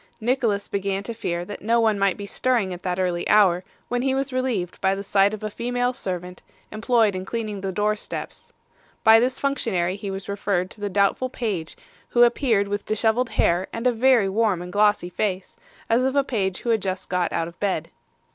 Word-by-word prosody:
Nicholas 225 -4 0
began 195 0 -2
to 235 - -5
fear 175 -6 -3
that 205 - -8
no 230 +3 +2
one 220 -3 +2
might 195 -2 +2
be 205 - -6
stirring 225 -3 0
at 175 - -8
that 180 -1 -2
early 180 -2 -1
hour, 190 -4 +5 0.2
when 245 0 -1
he 265 0 +1
was 270 0 -2
relieved 240 -9 -2
by 190 0 +2
the 200 - -5
sight 200 0 +3
of 215 -1 -7
a 215 - -2
female 245 +2 -1
servant, 180 -6 -5 0.3
employed 220 -2 +2
in 185 - -3
cleaning 215 -1 -4
the 195 0 -2
door 210 +2 +1
steps. 210 - -7 0.5
By 220 0 +8
this 255 +3 0
functionary 210 -10 0
he 200 0 -6
was 195 0 -6
referred 195 -2 -1
to 205 - -11
the 205 - -1
doubtful 200 +6 +1
page, 205 -11 -4 0.3
who 240 - +5
appeared 235 -4 +2
with 205 0 -4
dishevelled 220 +3 +1
hair 175 +2 +1
and 230 +2 -5
a 250 - +5
very 240 -3 +4
warm 205 -2 +1
and 180 - -9
glossy 205 -3 +2
face, 195 - -2 0.3
as 230 +2 +3
of 265 +1 0
a 280 - +4
page 195 -8 -2
who 235 - 0
had 220 -2 +2
just 185 -1 -3
got 180 -1 0
out 165 -1 -1
of 170 - -13
bed. 200 -2 -1
205 Hz, 210 wpm, -23 LUFS, 190-235 Hz, 0.5 s, By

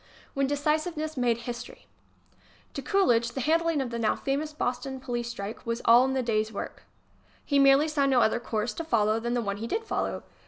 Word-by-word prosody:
i&? - - -25
When 275 0 +1
Decisiveness 310 +2 -1
Made 240 -3 +1
History 240 -1 -7 0.9
To - - -4
Coolidge 240 - +2
the 265 - -3
handling 325 +1 +2
of 250 -3 -4
the 235 - -3
now 220 -2 +2
famous 285 +3 -2
Boston 265 -2 -3
police 240 -2 -3
strike 215 -2 -6
was 230 -1 -2
all 240 +2 +7
in 265 - -1
the 260 -1 0
day's 215 -2 0
work. 200 - -6 0.6
He 285 -2 +2
merely 275 +2 +6
saw 290 -3 +1
no 265 -2 +4
other 220 +1 +2
course 230 -1 -2
to 330 - -5
follow 220 -7 +2
than 235 +1 -2
the 240 - 0
one 200 -1 -3
he 225 +3 -5
did 445 - -2
follow. 445 - -2
250 Hz, 205 wpm, -27 LUFS, 235-290 Hz, 0.9 s, all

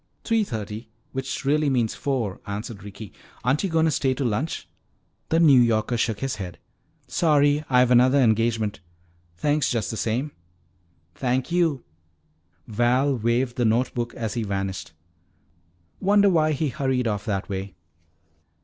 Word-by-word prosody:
"Three 225 -1 +2
thirty, 110 - -6 0.2
which 135 0 -4
really 150 +1 +2
means 120 -4 +1
four," 120 -9 -2
answered 105 +1 -5
Ricky. 105 0 -10 0.3
"Aren't 130 - +1
you 195 - 0
going 160 -1 +2
to 160 - +2
stay 130 -2 +1
to 135 - -2
lunch?" 125 +8 -2 0.6
The 165 - +3
New 145 -7 +7
Yorker 115 0 +1
shook 115 -2 -1
his 135 -5 -2
head. 90 -4 -6 0.5
"Sorry, 145 -2 +2
I've 125 -1 +4
another 125 +3 +5
engagement. 110 -3 +1 0.6
Thanks 145 +6 +1
just 115 -4 -1
the 110 - -5
same." 125 +8 -1 0.8
"Thank 130 - -1
you!" 165 -7 +1 0.8
Val 125 +5 +2
waved 120 +2 0
the 125 - +1
note 115 +4 +1
book 120 -1 -3
as 110 -3 -3
he 120 - -2
vanished. 95 -5 -4 1.1
"Wonder 200 +1 +4
why 155 -2 +3
he 150 +1 -1
hurried 130 -3 -1
off 105 -2 -2
that 100 -3 -2
way?" 95 -2 -5
125 Hz, 150 wpm, -24 LUFS, 110-145 Hz, 1.1 s, New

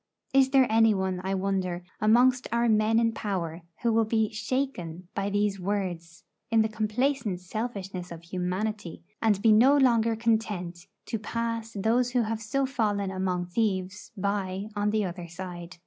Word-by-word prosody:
Is 270 -1 +5
there 265 -1 +5
any 225 -1 +4
one, 190 -1 -1
I 190 +1 -1
wonder, 185 -2 -1 0.2
amongst 245 +4 +4
our 235 +1 +2
men 215 0 +3
in 230 0 +3
power 180 -6 -3 0.2
who 235 -1 +3
will 225 0 +4
be 220 -1 +1
shaken 210 -8 -3
by 200 -3 -1
these 205 -1 0
words 180 -3 -3 0.3
in 225 -1 +4
the 220 - -1
complacent 220 -1 -1
selfishness 195 -2 -5
of 170 0 -8
humanity, 185 +2 -3 0.2
and 215 -3 +3
be 225 - +6
no 255 +7 +6
longer 230 -4 +3
content 210 -6 -1 0.2
to 225 - -3
pass 230 +1 -3
those 235 +5 +1
who 245 -2 +3
have 220 0 -3
so 270 +5 0
fallen 210 -7 -1
among 185 -2 -1
thieves 190 0 -2
by 200 0 -2
on 205 0 +1
the 215 -1 +1
other 175 -1 -6
side? 175 0 -8
210 Hz, 165 wpm, -27 LUFS, 185-230 Hz, 0.3 s, be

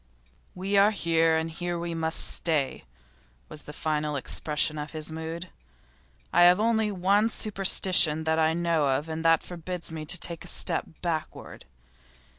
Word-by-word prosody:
'We 195 +2 -1
are 200 +1 +6
here, 165 -5 +2
and 160 0 -3
here 175 +1 -4
we 170 0 -4
must 160 0 0
stay,' 150 - +1 0.6
was 150 - -5
the - - -10
final 150 0 -2
expression 150 +2 -2
of 150 +2 -7
his 155 0 -3
mood. 165 +2 -6 0.8
'I - - +4
have 180 +2 +7
only 220 -1 +1
one 200 +4 +2
superstition 190 -7 +2
that 160 0 +1
I 160 0 +2
know 165 -4 +1
of 150 - -6
and 160 0 -5
that 165 -1 +4
forbids 175 -1 -6
me 155 -1 -7
to 175 - -1
take 170 -2 -3
a - - -10
step 175 -1 +1 0.2
backward. 160 -3 -5
165 Hz, 160 wpm, -27 LUFS, 160-180 Hz, 0.8 s, have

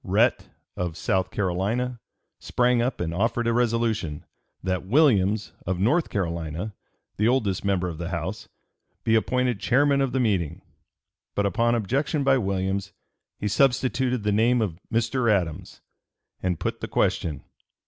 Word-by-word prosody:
Rhett, - - +2 0.3
of 85 -3 -3
South 95 +2 0
Carolina, 105 +7 -1 0.4
sprang 125 -1 +2
up 125 +3 -1
and 85 -1 -2
offered 115 +5 0
a 115 - +2
resolution, 115 -9 0 0.4
that 95 -1 -1
Williams, 105 -4 +3
of 90 -1 -1
North 125 - +2
Carolina, 85 +1 -3 0.4
the 105 - +2
oldest 115 -7 +1
member 95 -2 +1
of 85 -2 -6
the 85 0 -4
House, 90 +3 -4 0.5
be 115 - +2
appointed 125 0 +1
chairman 140 +6 +3
of 135 -2 +1
the 130 - 0
meeting; 95 - 0 0.7
but 100 - +1
upon 115 +4 +2
objection 140 - 0
by 135 -1 +4
Williams, 95 -1 -2 0.4
he 105 - -2
substituted 125 +1 +2
the 105 - +1
name 115 +4 +3
of 95 -7 -2
Mr. 115 +1 +1
Adams, 90 -3 -2 0.6
and 90 -3 -1
put - - -2
the - - -3
question. 75 -5 0
105 Hz, 145 wpm, -25 LUFS, 95-125 Hz, 0.7 s, by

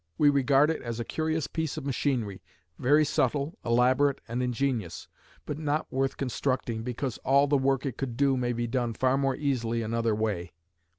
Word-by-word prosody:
We 145 -1 +5
regard 140 +2 +4
it 160 - -4
as 115 -1 -5
a 120 - -3
curious 160 -1 -1
piece 160 -2 -3
of 150 - -5
machinery, 125 -7 -1 0.4
very 150 +4 +4
subtle, 145 +4 0
elaborate, 130 +4 +3
and 120 +2 -2
ingenious, 125 -7 -2 0.4
but 150 0 -4
not 150 0 -2
worth 135 0 0
constructing, 125 -3 -2
because 125 +1 -4
all 140 +1 +4
the 145 0 +2
work 135 0 +1
it 130 -3 -3
could 125 -4 -4
do 140 -1 +3
may 120 -1 0
be 120 0 -2
done 120 -1 -1
more 135 +1 +2
easily 120 -5 -1
another 115 0 0
way." 100 -6 -2
130 Hz, 175 wpm, -28 LUFS, 120-140 Hz, 0.4 s, We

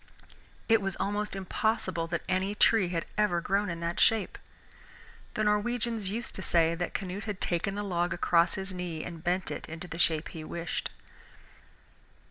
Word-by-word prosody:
It 225 -1 +5
was 195 -1 -2
almost 205 +1 -1
impossible 190 -3 0
that 170 0 -2
any 190 +2 0
tree 210 -2 +5
had 170 -2 -1
ever 205 -5 +3
grown 200 +3 +1
in 170 0 -4
that 170 +1 -2
shape. 220 -3 +3 1.0
The 215 - +1
Norwegians 215 0 +1
used 230 +4 -3
to - - -5
say 170 -2 +3
that 175 +1 -3
Canute 195 +1 -3
had 210 -3 -4
taken 175 +3 0
the 205 - -2
log 175 -3 0
across 170 0 +3
his 190 0 -4
knee 175 -3 -4
and 165 -2 -7
bent 180 +2 0
it - - -5
into 165 +3 -6
the 165 0 -7
shape 160 -2 +2
he 160 - -7
wished. 170 +2 -3
185 Hz, 170 wpm, -30 LUFS, 170-205 Hz, 1.0 s, It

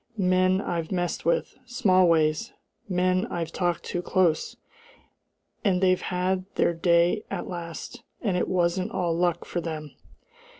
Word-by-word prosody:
Men 185 0 +3
I've 170 -4 -3
messed 175 -4 -2
with, 170 - +1
Smallways 185 - +3 0.4
men 185 +3 +1
I've 165 -5 -4
talked 175 -1 -1
to 175 - -3
close! 180 -3 +1 1.1
And 190 -5 +2
they've 185 -1 +3
had 185 0 -1
their - - +2
day 170 +4 +2
at 195 - -4
last! 175 +7 -7 0.2
And 200 -5 -1
it 180 - 0
wasn't 180 +2 +1
all 175 -6 -1
luck 175 0 0
for 175 - -3
them! 155 -3 -5
180 Hz, 135 wpm, -26 LUFS, 170-185 Hz, 1.1 s, Men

